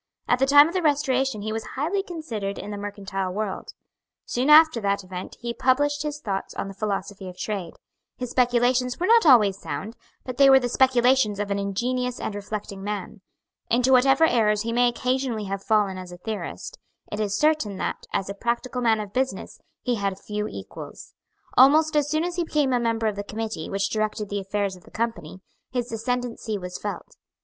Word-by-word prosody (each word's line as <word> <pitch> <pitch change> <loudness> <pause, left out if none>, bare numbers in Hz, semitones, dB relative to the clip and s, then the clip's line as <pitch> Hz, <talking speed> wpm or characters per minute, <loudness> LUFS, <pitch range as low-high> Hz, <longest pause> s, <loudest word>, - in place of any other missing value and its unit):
At 245 - +2
the 270 - +3
time 290 +2 +8
of 335 - -6
the 370 - 0
Restoration 270 -7 +1
he 215 0 -3
was 225 0 -3
highly 330 +9 0
considered 240 - -5
in 205 - -6
the 205 - -5
mercantile 195 -2 -4
world. 205 0 -4 0.5
Soon 255 +4 -1
after 310 -5 +7
that 200 -1 0
event 185 0 -8
he 235 -1 -4
published 290 +4 +1
his 300 -1 -4
thoughts 195 -8 -4
on - - -3
the 195 - -7
philosophy 195 -1 -4
of 180 - -12
trade. 195 -6 -4 0.4
His 250 -1 -5
speculations 245 0 +2
were 355 - 0
not 455 -3 +5
always 210 -8 +6
sound; 175 +11 -6 0.3
but 255 -1 -6
they 275 -1 +7
were 265 0 +8
the 245 -1 -2
speculations 250 -4 +3
of 205 -1 -2
an 200 - 0
ingenious 245 +5 -2
and - - -3
reflecting 205 -1 -6
man. 205 0 -5 0.5
Into 250 +2 +3
whatever 270 +4 +5
errors 210 -6 +2
he 230 0 -2
may 245 +1 +4
occasionally 250 -2 -1
have 195 0 -4
fallen 205 -3 +1
as 185 -1 -9
a 175 - -9
theorist, 215 +4 -6 0.3
it 210 - -4
is 205 -1 0
certain 300 -10 +1
that, - - -4
as 195 -1 -1
a 200 - -4
practical 240 +4 -2
man 225 -2 +3
of 205 -1 -6
business, 260 +2 -2 0.2
he 245 -2 0
had 195 -2 -2
few 210 +1 -4
equals. - - -9 0.4
Almost 305 +4 +6
as 295 -1 +2
soon 310 +1 +1
as 350 0 -3
he 350 - +1
became 295 -5 +1
a 245 - +2
member 230 -1 0
of 215 -2 0
the 205 - -3
committee 220 -5 -5
which 195 0 -1
directed 215 -1 -2
the 205 - -2
affairs 200 0 -2
of 180 - -17
the - - -17
Company, 225 -7 -4 0.3
his 245 -2 -3
ascendency 230 -1 -2
was 180 -1 -7
felt. 205 -1 -6
225 Hz, 200 wpm, -24 LUFS, 200-260 Hz, 0.5 s, time